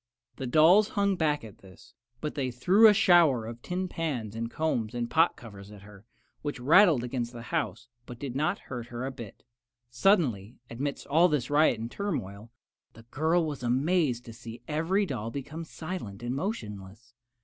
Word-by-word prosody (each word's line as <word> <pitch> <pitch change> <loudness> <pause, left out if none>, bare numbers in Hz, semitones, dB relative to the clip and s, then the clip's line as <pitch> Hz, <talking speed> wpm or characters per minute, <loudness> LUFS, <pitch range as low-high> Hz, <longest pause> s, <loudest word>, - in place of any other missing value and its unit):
The 135 - -4
dolls 170 - +5
hung 200 -1 +2
back 150 -4 0
at 110 -3 -12
this, 95 -2 -17 0.3
but 150 - -3
they 135 -3 -2
threw 185 - +5
a - - +8
shower 170 - +4
of 115 +1 -8
tin 185 +1 -3
pans 140 - -4
and 115 0 -3
combs 120 -7 -2
and 120 -1 -2
pot 165 +5 +3
covers 100 -4 -12
at 105 -2 -13
her, 105 +1 -15 0.3
which 145 -3 -4
rattled 160 - +5
against 120 -1 -3
the 115 -1 -8
house, - - -2 0.2
but 120 - -9
did 130 -1 -6
not 155 +8 0
hurt 120 -3 -6
her 120 +1 -5
a 135 - -3
bit. 120 -6 -11 0.5
Suddenly, 125 - +1
amidst 140 +5 -4
all 165 +5 +4
this 145 -4 -1
riot 145 -6 +3
and 115 +1 -5
turmoil, 115 - -4 0.4
the 115 - -15
girl 160 +3 +1
was 150 -4 -5
amazed 130 +1 +1
to 115 - -9
see 115 0 -10
every 165 +7 0
doll 115 - -4
become 145 +6 -6
silent 160 - -7
and 120 +1 -2
motionless. 115 - -6
130 Hz, 180 wpm, -28 LUFS, 115-165 Hz, 0.5 s, a